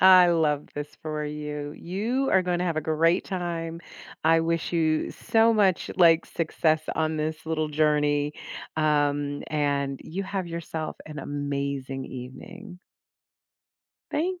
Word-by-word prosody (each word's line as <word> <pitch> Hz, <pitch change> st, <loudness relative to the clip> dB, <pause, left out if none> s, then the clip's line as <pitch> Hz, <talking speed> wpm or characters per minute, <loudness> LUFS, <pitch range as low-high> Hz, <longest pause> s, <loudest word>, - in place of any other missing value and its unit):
I 185 Hz, -1 st, +8 dB
love 150 Hz, -4 st, +1 dB
this 145 Hz, 0 st, -4 dB
for 155 Hz, -1 st, -3 dB
you. 150 Hz, -1 st, -5 dB
You 220 Hz, -, -1 dB
are 190 Hz, -1 st, +5 dB
going 180 Hz, -1 st, 0 dB
to -, -, +1 dB
have 165 Hz, -3 st, -1 dB
a -, -, +2 dB
great 165 Hz, +3 st, +2 dB
time. 170 Hz, -3 st, -3 dB, 0.4 s
I 165 Hz, +1 st, +5 dB
wish 165 Hz, +1 st, -1 dB
you 160 Hz, -2 st, +1 dB
so 230 Hz, 0 st, +3 dB
much, 200 Hz, -5 st, +2 dB
like, 170 Hz, -2 st, +6 dB
success 160 Hz, -1 st, 0 dB
on 160 Hz, 0 st, 0 dB
this 155 Hz, 0 st, -3 dB
little 155 Hz, -1 st, -1 dB
journey, 150 Hz, -1 st, +2 dB, 0.4 s
um, 145 Hz, -2 st, +1 dB
and 140 Hz, -2 st, 0 dB
you 185 Hz, +5 st, -4 dB
have 190 Hz, -2 st, -3 dB
yourself 165 Hz, -1 st, -5 dB
an 150 Hz, -1 st, -7 dB
amazing 140 Hz, -1 st, -3 dB
evening. 130 Hz, +9 st, -9 dB, 1.3 s
Thank 355 Hz, +4 st, -1 dB
155 Hz, 135 wpm, -26 LUFS, 150-175 Hz, 1.3 s, I